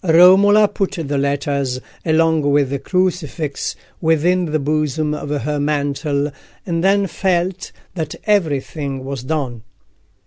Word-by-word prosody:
Romola 190 +5 +6
put 200 -1 -2
the 150 -6 -2
letters, 140 -2 -1 0.2
along 160 0 +2
with 145 -2 +2
the 140 - -1
crucifix, 170 -3 -2 0.3
within 170 +3 +2
the 155 -1 0
bosom 150 +1 -1
of 145 -1 -5
her 150 +1 -1
mantle, 145 0 -1 0.3
and 170 -2 -1
then 200 +1 +3
felt 185 0 -1 0.2
that 160 -4 -4
everything 145 -8 -1
was 135 -2 -4
done. 130 -4 -3
155 Hz, 125 wpm, -19 LUFS, 140-180 Hz, 0.3 s, Romola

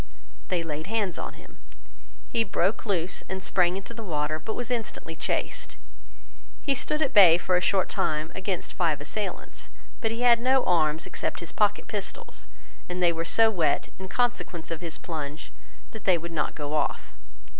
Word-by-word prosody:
They 175 -2 0
laid 155 0 -4
hands 210 -4 -1
on - - -5
him. - - -16 0.7
He 230 - +2
broke 200 +1 0
loose 185 -2 +1
and 190 0 -4
sprang 180 0 +2
into 195 +4 -7
the 230 - -7
water, 155 -5 -1
but 220 +8 -5
was 245 0 -3
instantly 220 -8 -3
chased. - - -2 0.9
He 280 - +2
stood 305 +4 0
at 275 - -1
bay 180 -6 +9
for 180 +1 +1
a 180 - +3
short 190 0 +2
time 155 +1 -1
against 190 -2 -3
five 160 -5 +1
assailants. 190 +6 -5 0.3
But 225 - +1
he 230 +2 -3
had 240 -1 +6
no 260 +1 +4
arms 160 -3 +2
except - - -3
his 170 - -4
pocket 210 -1 +1
pistols, 205 -3 -5 0.4
and 180 - -3
they 170 -1 +5
were 165 0 -2
so 225 +6 +4
wet, 165 -8 +1
in 190 - -6
consequence 195 -7 -1
of 165 0 -3
his 165 -2 -3
plunge, 155 -3 -6 0.4
that 220 - -10
they 185 -3 +5
would 170 +1 -6
not 155 -2 -1
go 145 -1 -4
off. 155 - -1
180 Hz, 180 wpm, -27 LUFS, 165-220 Hz, 0.9 s, bay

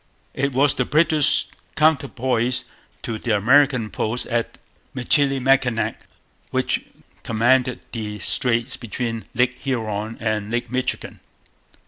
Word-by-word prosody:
It 140 -1 -1
was 140 +2 +3
the 125 - 0
British 155 +2 +4 0.3
counterpoise 130 -5 +1 0.4
to 110 -2 -4
the 110 -2 0
American 125 0 +3
post 110 +6 -1
at 115 -1 -2 0.4
Michilimackinac, 135 -2 +1 0.4
which - - -1 0.4
commanded 125 +2 +1
the 105 -3 -5
straits 120 +2 0
between 115 0 -4
Lake 125 +1 +1
Huron 110 -4 -3
and 110 -2 -2
Lake 120 0 -3
Michigan. 130 0 -3
125 Hz, 105 wpm, -22 LUFS, 115-135 Hz, 0.4 s, British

